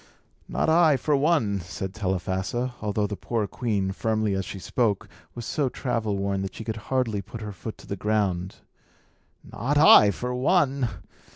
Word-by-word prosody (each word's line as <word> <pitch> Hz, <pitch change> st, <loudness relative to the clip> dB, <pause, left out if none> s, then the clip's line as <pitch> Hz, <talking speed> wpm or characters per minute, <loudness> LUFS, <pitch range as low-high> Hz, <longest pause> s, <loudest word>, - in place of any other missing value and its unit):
"Not -, -, -1 dB
I, 160 Hz, -3 st, +5 dB
for 150 Hz, +2 st, +1 dB
one," 140 Hz, -9 st, +2 dB
said 90 Hz, +2 st, -6 dB
Telephassa; 95 Hz, +4 st, -2 dB
although 105 Hz, 0 st, 0 dB
the 105 Hz, 0 st, -3 dB
poor 115 Hz, +1 st, -2 dB
queen, 100 Hz, -3 st, -1 dB
firmly 110 Hz, 0 st, 0 dB
as 95 Hz, 0 st, -1 dB
she -, -, -6 dB
spoke, 105 Hz, +1 st, 0 dB, 0.3 s
was 120 Hz, -1 st, -6 dB
so 140 Hz, -1 st, 0 dB
travel 115 Hz, -6 st, -2 dB
worn 100 Hz, 0 st, -1 dB
that 95 Hz, -1 st, -5 dB
she -, -, -6 dB
could 110 Hz, 0 st, -4 dB
hardly 125 Hz, -6 st, 0 dB
put 110 Hz, +4 st, -9 dB
her 105 Hz, -1 st, -5 dB
foot 110 Hz, +2 st, -8 dB
to -, -, -14 dB
the 100 Hz, -, -4 dB
ground 100 Hz, -3 st, -1 dB, 0.9 s
"not 135 Hz, +7 st, -2 dB
I, 145 Hz, -8 st, +8 dB
for 125 Hz, +5 st, -3 dB
one! 135 Hz, -2 st, +2 dB
110 Hz, 170 wpm, -25 LUFS, 100-125 Hz, 0.9 s, I